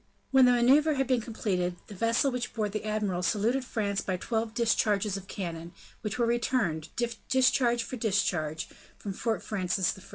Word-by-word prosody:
When 265 Hz, -1 st, +7 dB
the 250 Hz, -, +6 dB
maneuver 280 Hz, +6 st, +4 dB
had 270 Hz, 0 st, +1 dB
been 255 Hz, -2 st, +1 dB
completed, 185 Hz, -6 st, -2 dB
the -, -, -11 dB
vessel 230 Hz, +7 st, +1 dB
which 245 Hz, -1 st, -4 dB
bore 215 Hz, -2 st, 0 dB
the 215 Hz, +1 st, -4 dB
admiral 210 Hz, -4 st, -1 dB
saluted 225 Hz, +8 st, +1 dB
France 205 Hz, -5 st, -1 dB
by 185 Hz, -1 st, -2 dB
twelve 225 Hz, +3 st, -2 dB
discharges 210 Hz, -4 st, +1 dB
of 195 Hz, -1 st, -7 dB
cannon, 170 Hz, -3 st, -6 dB, 0.3 s
which 210 Hz, +2 st, -3 dB
were 240 Hz, -, +2 dB
returned, 230 Hz, -9 st, 0 dB, 0.4 s
discharge 255 Hz, -2 st, +3 dB
for 255 Hz, -, -6 dB
discharge, 180 Hz, -8 st, 0 dB, 0.3 s
from 200 Hz, -, -5 dB
Fort 225 Hz, +3 st, -2 dB
Francis 185 Hz, -2 st, 0 dB
I. 190 Hz, -, -13 dB
215 Hz, 170 wpm, -29 LUFS, 190-240 Hz, 0.4 s, When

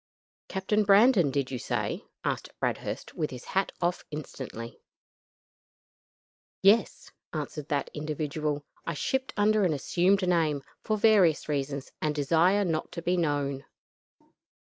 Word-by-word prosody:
"Captain 200 Hz, +3 st, 0 dB
Brandon, 200 Hz, -, +6 dB
did 135 Hz, -1 st, -1 dB
you 125 Hz, -, -3 dB
say?" -, -, -2 dB, 0.2 s
asked -, -, -2 dB
Bradhurst, -, -, -3 dB
with 155 Hz, -, -2 dB
his 125 Hz, -1 st, -9 dB
hat 195 Hz, 0 st, 0 dB
off 175 Hz, +1 st, 0 dB
instantly. 130 Hz, -6 st, -7 dB, 1.8 s
"Yes," 205 Hz, +2 st, +3 dB, 0.2 s
answered 150 Hz, -1 st, -4 dB
that 145 Hz, -3 st, -1 dB
individual. 150 Hz, -1 st, -2 dB, 0.2 s
"I 165 Hz, -, -3 dB
shipped 265 Hz, -, -1 dB
under 210 Hz, 0 st, +3 dB
an 175 Hz, -4 st, +2 dB
assumed 180 Hz, +7 st, +2 dB
name, 155 Hz, -5 st, +1 dB, 0.2 s
for 215 Hz, -, 0 dB
various 200 Hz, -7 st, +4 dB
reasons, 140 Hz, -2 st, -3 dB
and 150 Hz, -1 st, 0 dB
desire 170 Hz, +7 st, +3 dB
not 160 Hz, -3 st, -2 dB
to 170 Hz, -, -6 dB
be 180 Hz, +2 st, +2 dB
known. 145 Hz, -5 st, -1 dB
160 Hz, 125 wpm, -28 LUFS, 145-195 Hz, 1.8 s, Brandon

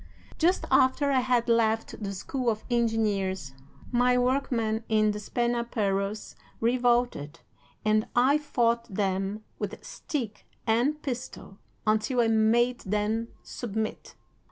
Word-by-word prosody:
Just 350 Hz, +3 st, +2 dB
after 265 Hz, +2 st, +4 dB
I 265 Hz, -, +4 dB
had 250 Hz, -2 st, +1 dB
left 225 Hz, -1 st, +1 dB
the 200 Hz, -1 st, -3 dB
School 245 Hz, +6 st, -2 dB
of 215 Hz, -1 st, -2 dB
Engineers, 205 Hz, -, 0 dB, 0.4 s
my 250 Hz, 0 st, +3 dB
workmen 245 Hz, -4 st, 0 dB
in 215 Hz, -1 st, +3 dB
Despenaperros 210 Hz, -2 st, -1 dB, 0.3 s
revolted, 240 Hz, -, +1 dB, 0.4 s
and 215 Hz, 0 st, +2 dB
I 265 Hz, +5 st, +4 dB
fought 235 Hz, -6 st, 0 dB
them 195 Hz, +1 st, -1 dB, 0.2 s
with -, -, -5 dB
stick 240 Hz, -9 st, -5 dB, 0.2 s
and 245 Hz, +7 st, +2 dB
pistol 245 Hz, -6 st, -6 dB, 0.3 s
until 215 Hz, +4 st, +1 dB
I 230 Hz, -, +2 dB
made 230 Hz, +3 st, +3 dB
them 210 Hz, +3 st, -1 dB, 0.2 s
submit. 220 Hz, -2 st, -5 dB
230 Hz, 110 wpm, -27 LUFS, 215-245 Hz, 0.4 s, after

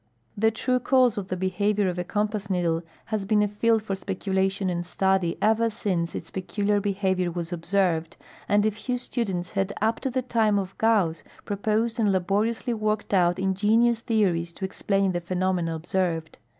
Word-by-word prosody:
The 220 Hz, +2 st, +3 dB
tme 250 Hz, +2 st, 0 dB
cause 255 Hz, -3 st, +4 dB
of 200 Hz, -3 st, -4 dB
the 185 Hz, -, -3 dB
behavior 200 Hz, +2 st, +1 dB
of 180 Hz, -1 st, -2 dB
a -, -, 0 dB
compass 210 Hz, +1 st, -2 dB
needle 170 Hz, -3 st, +1 dB, 0.3 s
has 210 Hz, -2 st, 0 dB
been 210 Hz, +1 st, +3 dB
a -, -, +2 dB
field 220 Hz, +2 st, +1 dB
for 200 Hz, -3 st, -2 dB
speculation 190 Hz, 0 st, -1 dB
and 175 Hz, -1 st, -1 dB
study 190 Hz, -1 st, +1 dB
ever 225 Hz, +2 st, +3 dB
since 180 Hz, -6 st, -2 dB
its 165 Hz, -, -6 dB
peculiar 205 Hz, +2 st, 0 dB
behavior 190 Hz, -3 st, 0 dB
was 170 Hz, 0 st, -4 dB
observed, 170 Hz, -2 st, 0 dB, 0.3 s
and 205 Hz, +1 st, +4 dB
a 215 Hz, -, +3 dB
few 245 Hz, +4 st, -3 dB
students 195 Hz, -8 st, -3 dB
had 195 Hz, 0 st, -1 dB
up 220 Hz, +2 st, +1 dB
to 270 Hz, -, -2 dB
the 255 Hz, 0 st, -1 dB
time 225 Hz, -4 st, +2 dB
of 195 Hz, -1 st, -3 dB
Gauss 205 Hz, -8 st, +2 dB, 0.2 s
proposed 220 Hz, +3 st, 0 dB
and 210 Hz, -3 st, +3 dB
laboriously 205 Hz, +6 st, 0 dB
worked 215 Hz, -1 st, -1 dB
out 175 Hz, -2 st, +3 dB
ingenious 210 Hz, +5 st, +2 dB
theories 185 Hz, -8 st, 0 dB
to 190 Hz, -, -4 dB
explain 195 Hz, 0 st, 0 dB
the 175 Hz, -1 st, -2 dB
phenomena 180 Hz, -1 st, -1 dB
observed. 165 Hz, -1 st, -2 dB
195 Hz, 175 wpm, -26 LUFS, 180-215 Hz, 0.3 s, cause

